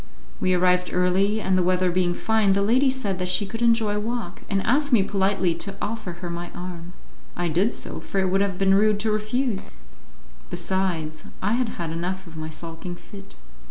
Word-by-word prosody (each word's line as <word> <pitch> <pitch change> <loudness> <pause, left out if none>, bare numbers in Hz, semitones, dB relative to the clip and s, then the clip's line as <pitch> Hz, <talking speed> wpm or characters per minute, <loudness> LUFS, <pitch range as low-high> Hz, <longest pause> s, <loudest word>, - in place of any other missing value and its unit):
We 185 0 +2
arrived 180 0 +3
early, 190 +4 +2
and 190 -2 +1
the 185 - +3
weather 180 0 +2
being 175 0 +1
fine, 220 -2 +2
the 200 +1 +2
lady 255 +6 +4
said 210 -8 -2
that 180 0 -1
she 180 +3 +2
could 225 +4 -6
enjoy 230 -3 +3
a - - +1
walk, 215 -4 -4
and 195 -1 +1
asked 285 +4 +2
me 225 -6 +6
politely 195 -2 +1
to 195 +4 -6
offer 215 -4 -3
her 175 0 -6
my 170 0 -5
arm. 175 -1 -7 0.4
I 175 0 0
did 185 +8 +2
so, - - -5
for - - -5
it 190 -1 +1
would 195 +1 +3
have 200 -2 0
been 195 0 +4
rude 210 +1 +4
to 220 0 +1
refuse; 215 +1 -1 0.8
besides 165 -5 -2
I 210 - 0
had 245 -1 +1
had 170 -2 -3
enough 180 +3 -3
of 165 -2 -12
my 155 0 -5
sulking 165 +2 -6
fit. 195 +2 -13
190 Hz, 200 wpm, -24 LUFS, 180-210 Hz, 0.8 s, me